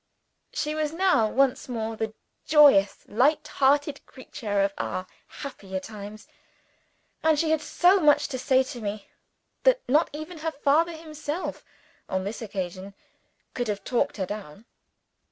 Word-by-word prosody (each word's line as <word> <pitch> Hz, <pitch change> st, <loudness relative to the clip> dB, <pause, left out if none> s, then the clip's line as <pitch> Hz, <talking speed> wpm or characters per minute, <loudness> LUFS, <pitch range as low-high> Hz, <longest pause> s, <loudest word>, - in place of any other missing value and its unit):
She 300 Hz, 0 st, -2 dB
was 310 Hz, -1 st, -1 dB
now 355 Hz, -10 st, +3 dB
once 265 Hz, +2 st, +1 dB
more 225 Hz, -2 st, -3 dB
the 220 Hz, 0 st, -4 dB, 0.3 s
joyous 285 Hz, -11 st, +5 dB
light 295 Hz, +7 st, +2 dB
hearted 285 Hz, +1 st, +1 dB
creature 210 Hz, -6 st, -3 dB
of 195 Hz, 0 st, 0 dB
our 185 Hz, -, -3 dB, 0.2 s
happier 195 Hz, -9 st, -6 dB
time; 210 Hz, +1 st, -9 dB, 1.0 s
and 315 Hz, -1 st, +3 dB
she 315 Hz, +1 st, +1 dB
had 315 Hz, -1 st, +2 dB
so 355 Hz, +5 st, +4 dB
much 300 Hz, -4 st, +4 dB
to 260 Hz, -3 st, -4 dB
say 260 Hz, 0 st, +3 dB
to 250 Hz, -2 st, -8 dB
me, 205 Hz, -1 st, -5 dB, 0.5 s
that -, -, +3 dB
not 295 Hz, +6 st, +3 dB
even 310 Hz, +3 st, -8 dB
her 320 Hz, +1 st, -1 dB
father 305 Hz, +4 st, +2 dB
himself 310 Hz, +1 st, -5 dB, 0.5 s
(on 190 Hz, 0 st, -1 dB
this 205 Hz, +5 st, -5 dB
occasion) 190 Hz, -2 st, -5 dB, 0.6 s
could 245 Hz, -2 st, -2 dB
have 205 Hz, -2 st, -3 dB
talked 240 Hz, 0 st, 0 dB
her 190 Hz, -, -1 dB
down. 205 Hz, 0 st, -8 dB
260 Hz, 145 wpm, -26 LUFS, 210-305 Hz, 1.0 s, joyous